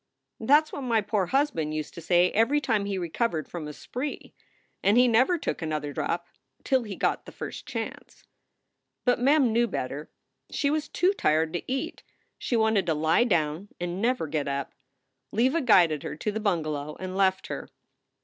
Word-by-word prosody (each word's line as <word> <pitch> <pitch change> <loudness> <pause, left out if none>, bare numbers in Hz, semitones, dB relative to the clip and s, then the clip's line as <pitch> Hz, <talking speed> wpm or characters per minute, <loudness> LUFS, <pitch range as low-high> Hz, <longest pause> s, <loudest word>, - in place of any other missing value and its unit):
"That 285 +7 +5
s 310 - -18
what - - -4
my 235 -4 +2
poor 205 -2 0
husband 265 - 0
used 155 -1 -4
to 170 - -8
say 175 +2 +3
every 230 +7 +3
time 220 -7 0
he 200 -1 -2
recovered 170 -1 -1
from 165 -4 -6
a - - -5
spree. 255 - -6 0.5
And 205 +4 +4
he 250 0 +6
never 255 +10 +4
took 310 - -3
another 155 -2 -3
drop 170 +5 -2 0.4
till 265 -1 +2
he 210 -4 -6
got - - -1
the - - -8
first - - -7
chance." - - -6 0.8
But 245 -1 +3
Mem 270 -2 +4
knew 235 +1 +3
better. 140 - -4 0.4
She 280 - 0
was 305 0 -1
too 370 +3 +2
tired 160 - +1
to 175 +8 -4
eat. 270 +5 -3 0.4
She 245 - -1
wanted 220 -4 +2
to 160 - +2
lie 160 +10 +3
down 170 -2 0
and 175 +2 -3
never 245 -5 +1
get 150 -2 -2
up. 140 0 -3 0.6
Leva 260 +9 +2
guided 175 - +4
her 145 - -5
to 210 +7 -2
the 215 - -3
bungalow 155 -7 -2
and 185 0 -5
left 190 -1 +2
her. - - -6
200 Hz, 185 wpm, -27 LUFS, 160-245 Hz, 0.8 s, he